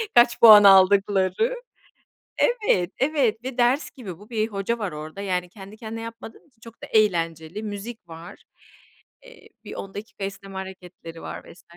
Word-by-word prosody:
kaç 240 0 +5
puan 215 -3 +10
aldıkları 195 - +4 0.8
Evet, 420 - +1
evet 260 -6 0
ve 260 -1 -6
ders 250 +4 +1
gibi 195 - -10
bu 205 +2 -16
bir 220 -2 -1
hoca 210 +2 -3
var 205 -4 -3
orada. 155 +5 -8
Yani 180 -2 -2
kendi 200 +2 -13
kendine 225 0 -7
yapmadığın 230 +3 -10
için 245 -6 -35
çok 230 0 -15
da - - -7
eğlenceli. 170 -3 0
Müzik 210 0 -7
var. 165 +1 -12 0.8
Eee, - - -17
bir - - -9
10 195 - -8
dakika 210 -1 -9
esneme 195 0 -7
hareketleri 180 -3 -10
var - - -8
vs. 170 - -21
205 Hz, 160 wpm, -23 LUFS, 185-230 Hz, 0.8 s, puan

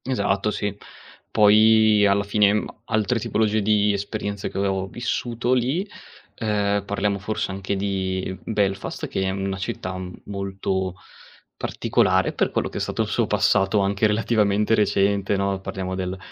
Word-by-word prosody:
Esatto, 100 -5 0
sì. 105 -1 -2 0.5
Poi 110 0 +5
alla 100 +1 +2
fine, 100 0 +3
mhmm, 105 - 0 0.2
altre 110 +1 0
tipologie 110 0 +1
di 105 0 +3
esperienze 100 0 -4
che - - -8
avevo 95 -1 0
vissuto 120 +2 -2
lì, 130 - 0 0.5
ehm, 100 -2 0
parliamo 100 0 -1
forse 105 0 -3
anche 95 +1 -3
di 95 -1 -2
Belfast 100 -3 -2
che - - -3
è 95 - 0
una 95 0 -2
città 90 0 -4
m 90 -1 -6
molto 95 -2 -3 0.6
particolare 95 0 +1
per - - +1
quello - - -1
che - - -5
è - - -3
stato - - -1
il - - -5
suo - - 0
passato 95 +2 +2
anche 100 +2 +2
relativamente 105 -1 +1
recente 100 -1 +2
no. 100 0 -1
Parliamo 95 -1 -4
del 95 0 -3
100 Hz, 150 wpm, -23 LUFS, 95-105 Hz, 0.6 s, Poi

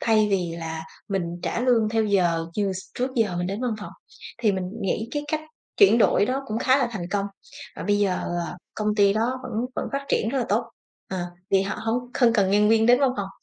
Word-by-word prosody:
thay 215 -2 +3
vì 180 -4 0
là 160 -1 -5 0.3
mình 195 -2 0 0.2
trả - - -1
lương 240 -3 +3
theo 225 0 +1
giờ 175 -5 +2
như 200 -2 +1
s 185 - -5 0.2
trước 255 +1 -1
giờ 215 -8 +1
mình 175 - -1
đến 200 +4 -3
văn 240 -3 0
phòng. - - -8 0.5
Thì 220 -3 +2
mình 190 -1 -2 0.2
nghĩ 205 +4 -1
cái 290 - -1
cách 310 0 0 0.4
chuyển 395 - +6
đổi 205 -2 +4
đó 265 +3 -1
cũng 220 -1 -2
khá 260 +2 +4
là 265 - +2
thành 175 -6 -4
công 200 0 0 0.5
và - - -5
bây 205 0 +2
giờ, 200 -2 +2 0.4
ờ, 175 - -7 0.2
công 210 -1 0
ty 200 -1 +4
đó 235 +4 0
vẫn 255 -1 -7 0.2
vẫn - - -1
phát 275 0 -2
triển 220 - +1
rất 270 - -1
là 250 - 0
tốt. - - +2 0.5
Ờ, 190 - -2 0.3
vì 195 -1 +4
họ 195 - -3
hông 245 +3 -2
không 240 -3 +4
cần 195 -4 +3
nhân 210 +1 +4
viên 225 0 +4
đến 245 +2 +6
văn 275 -2 +4
phòng: 200 -1 -3
215 Hz, 240 wpm, -24 LUFS, 195-245 Hz, 0.5 s, chuyển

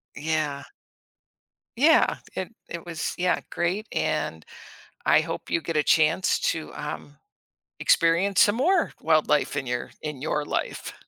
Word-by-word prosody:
Yeah. 150 -2 -2 1.1
Yeah, 310 +5 +4 0.2
it 190 +4 -5
it 170 0 -7
was 165 -2 -3
yeah, 180 0 +1
great, 185 +6 -1
and 80 - -1 0.6
I - - +6
hope - - -6
you 165 - 0
get 155 +1 -1
a - - +4
chance 160 +4 +3
to 160 -1 -6
um 150 -1 -7 0.6
experience 170 +4 +3
some 205 - +5
more 345 +7 +2
wildlife 155 -2 +2
in 140 -3 -3
your 120 0 -3
in 150 -3 -6
your 150 -1 -1
life. - - -3
160 Hz, 135 wpm, -25 LUFS, 150-185 Hz, 1.1 s, I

